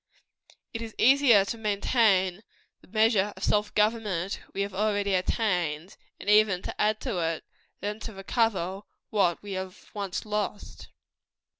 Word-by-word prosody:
It 225 - -4
is 225 -1 -7
easier 255 -6 +6
to 230 +3 -5
maintain 200 -3 +2 0.4
the - - -20
measure 215 -1 +2
of - - -8
self 210 0 +1
government 210 -4 0
we 200 - -3
have 200 -1 -3
already 205 0 0
attained, 180 -4 -1 0.2
and - - -11
even 210 -3 +4
to - - -4
add 215 0 +2
to 230 -9 -2
it, 165 -1 -1 0.4
than 210 +1 -3
to 220 0 -7
recover 195 -2 -1 0.3
what 195 -5 +1
we 205 - -7
have 190 0 -7
once 200 -2 -4
lost. 210 -1 -4
205 Hz, 145 wpm, -27 LUFS, 190-215 Hz, 0.4 s, easier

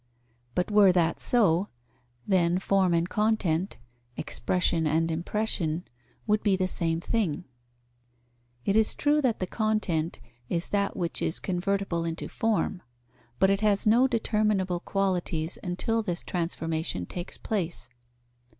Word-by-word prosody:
But 180 +3 0
were 205 -2 +7
that 170 -2 +2
so, 200 -6 +3 0.6
then 180 -3 +3
form 190 -1 +2
and 170 0 +2
content, 200 -4 0 0.4
expression 170 -3 0
and 165 +2 +1
impression, 170 -1 -1 0.4
would 210 0 +2
be 205 -3 +3
the 185 0 0
same 165 -2 -1
thing. 180 -4 -1 1.2
It 200 - +2
is 220 -1 +3
true 300 +1 +2
that 250 -5 +1
the 185 - -1
content 185 -6 -1 0.3
is 170 0 -1
that 200 -1 0
which 175 -3 -1
is 160 - 0
convertible 190 -1 -1
into 165 0 -4
form, 215 -4 0 0.6
but 190 0 +4
it 195 +1 +1
has 205 -2 +2
no 235 +5 +5
determinable 210 -6 +1
qualities 180 -4 -1
until 195 +5 -1
this 175 -5 -4
transformation 165 - -2
takes 175 - -7
place. 180 -6 -3
185 Hz, 130 wpm, -27 LUFS, 170-210 Hz, 1.2 s, were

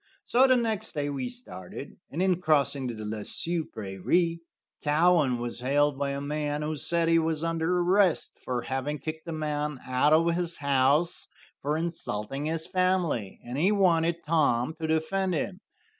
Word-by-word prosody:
So 255 +3 +5
the 255 -1 +5
next 225 -4 -1
day 145 -1 -2
we 135 -3 -3
started, 95 - -9
and 170 +6 -1
in 185 -2 +1
crossing 145 -4 +2
the 110 -3 -5
Le 105 0 -4
Sueur 170 +5 -1
prairie, 115 - 0 0.4
Cowan 150 -3 +3
was 120 0 -4
hailed 140 +2 +1
by 140 -1 0
a 140 0 -2
man 150 +1 -2
who 155 +1 -2
said 170 +3 +1
he 165 0 +5
was 160 -1 -1
under 165 +1 0
arrest 185 -1 +3
for 125 -2 -2
having 135 +4 -2
kicked 160 +2 -6
a - - -3
man 150 -2 -2
out 130 +3 +2
of 165 +2 +4
his 170 -1 0
house 140 +4 +1 0.3
for 150 +2 0
insulting 145 -6 -3
his 160 +1 -1
family, 180 - 0
and 125 +3 -4
he 185 +6 +3
wanted 170 -4 +2
Tom 150 -3 +2
to 160 - -1
defend 175 +4 0
him. 185 +4 -3
155 Hz, 170 wpm, -28 LUFS, 140-170 Hz, 0.4 s, So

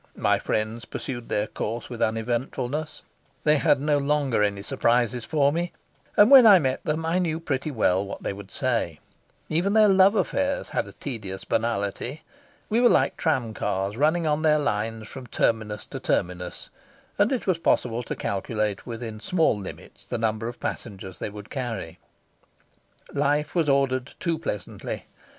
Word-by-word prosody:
My - - +2
friends 110 +2 -2
pursued 120 -4 -6
their 105 - +1
course 115 +1 -4
with 120 -2 -7
uneventfulness; 125 +6 -2 0.4
they 150 0 +4
had 140 - +3
no 145 0 +2
longer 140 -5 +1
any 100 -1 0
surprises 120 +2 +1
for 145 -3 +2
me, 175 +1 -2 0.4
and 210 +5 +7
when 260 -4 +10
I 200 -3 +10
met 130 -6 -1
them 155 0 -1
I 165 +3 +1
knew 165 -3 0
pretty 145 -3 -2
well 100 -8 +2
what 100 - -7
they - - -2
would 100 0 -10
say; 115 - -1 0.5
even 175 +6 +1
their 215 -1 +6
love 195 +1 +6
affairs 280 +6 0
had - - -1
a - - -11
tedious 100 -8 -6
banality. 115 +5 -2 0.4
We 225 +2 +2
were 245 - +7
like - - +3
tram 130 -9 0
cars 95 0 -2
running 155 +6 +2
on 150 0 +1
their 155 -1 +4
lines 110 -5 -2
from 130 -2 -9
terminus 110 -2 0
to - - -7
terminus, 90 0 -2 0.5
and 205 +4 +4
it 255 - -1
was 185 -3 +1
possible 120 -7 +1
to 120 - -5
calculate 105 +1 -2
within 115 -2 -6
small 165 +2 +2
limits 100 -2 -9
the - - -4
number 110 0 -1
of 120 - -7
passengers 95 -4 -6
they - - -3
would 105 +1 -10
carry. 115 - -4 1.1
Life 150 +1 +1
was 165 -4 +2
ordered 135 -1 +1
too 165 -3 -1
pleasantly. 105 - -5
125 Hz, 165 wpm, -25 LUFS, 110-155 Hz, 1.1 s, when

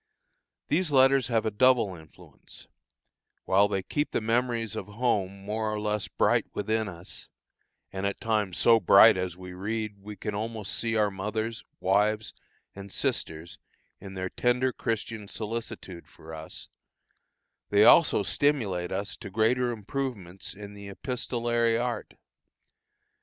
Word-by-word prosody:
These 165 0 +1
letters 135 -2 +5
have 115 -3 +1
a 110 - 0
double 120 -2 +3
influence; 80 -3 -15 0.8
while 100 +2 +4
they 95 -2 -2
keep 145 +8 -1
the - - 0
memories 115 -1 0
of - - -5
home 105 -3 -1
more 110 +1 -2
or 105 - -2
less 105 -1 -1
bright - - +2
within 110 +1 0
us, 85 -1 -11 0.7
and 95 0 -4
at 100 - -4
times 105 -5 -1
so 115 -1 +5
bright 110 0 +8
that 95 -2 -2
as 90 -1 -8
we 90 0 -9
read 105 +2 -4
we 105 +1 -9
can 105 +1 -5
almost 110 0 -4
see 115 -1 -1
our 105 -2 +2
mothers, 110 +3 -3 0.2
wives, 105 +3 +1 0.4
and 100 0 -10
sisters 80 -1 -3 0.4
in 95 0 -10
their 95 0 -3
tender 125 +1 +1
Christian 115 -2 -3
solicitude 110 -5 -6
for 80 +1 -13
us, 80 0 -9 1.0
they - - +5
also - - +6
stimulate 105 -12 0
us 100 +3 -3
to 110 -4 -8
greater 115 +5 +2
improvements 105 -5 -5
in 100 0 -9
the 100 0 -10
epistolary 120 0 -1
art. 120 -2 -3
105 Hz, 140 wpm, -28 LUFS, 100-115 Hz, 1.0 s, bright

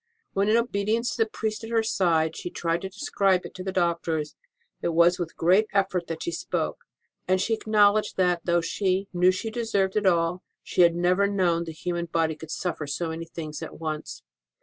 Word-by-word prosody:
When, 200 +1 +1
in 220 - +5
obedience 230 0 0
to 225 - +2
the 220 - -8
priest 215 0 -3
at 225 - -6
her 225 -1 +2
side, 165 -7 +1
she - - -5
tried 170 0 -1
to 190 - -5
describe 195 -1 +1
it - - -9
to 185 - -7
the 190 - -3
doctors, 170 -4 -1 0.5
it - - -1
was 170 +2 +5
with 170 -2 -4
great 185 +6 +4
effort 190 -3 +1
that 165 -1 -5
she 345 - -2
spoke; - - -3 0.4
and 185 0 +3
she 225 - 0
acknowledged 215 -1 +3
that, 180 -2 +2
though 175 -1 +2
she 190 +3 -1
knew 180 +1 +4
she 205 +4 -1
deserved 205 -5 0
it 210 -2 +2
all, 170 0 +2 0.2
she - - +1
had 170 -1 +5
never 180 +3 +2
known 175 -4 +1
the 165 - -6
human 170 +2 -3
body 165 -1 0
could 160 0 -11
suffer 160 -3 -3
so 165 +4 -2
many 165 +1 -5
things 155 -2 -7
at - - -8
once. 155 -2 -5
180 Hz, 205 wpm, -26 LUFS, 165-200 Hz, 0.5 s, in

